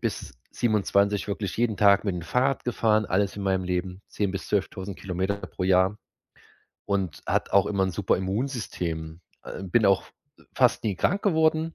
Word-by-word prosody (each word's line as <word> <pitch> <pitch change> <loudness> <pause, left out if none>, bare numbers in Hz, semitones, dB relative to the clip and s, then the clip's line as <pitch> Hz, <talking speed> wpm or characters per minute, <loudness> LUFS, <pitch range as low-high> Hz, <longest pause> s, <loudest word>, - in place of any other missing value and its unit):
bis - - -4 0.2
27 105 -2 +1
wirklich 100 -2 -3
jeden 115 -2 +1
Tag 100 0 +5
mit 100 -4 -1
dem 85 - -5
Fahrrad 125 +10 0
gefahren, 110 -3 +1
alles 100 +2 0
in 100 - -5
meinem 95 -1 0
Leben, 90 +1 -3
10 100 -2 -1
bis 95 - -5
12.000 100 -1 -2
Kilometer 95 +2 -2
pro 100 - -7
Jahr 95 +2 +3 0.9
und 95 -6 -2
hat - - 0
auch 100 0 +5
immer 100 -2 +1
'n 95 - -2
super 95 +2 +1
Immunsystem. 95 - -3 0.2
Äh, - - -7
bin 105 +4 +2
auch 95 -1 +4 0.5
fast 125 -2 +3
nie 105 -4 -1
krank 200 - +1
geworden. 160 -3 +2
100 Hz, 170 wpm, -26 LUFS, 95-110 Hz, 0.9 s, Tag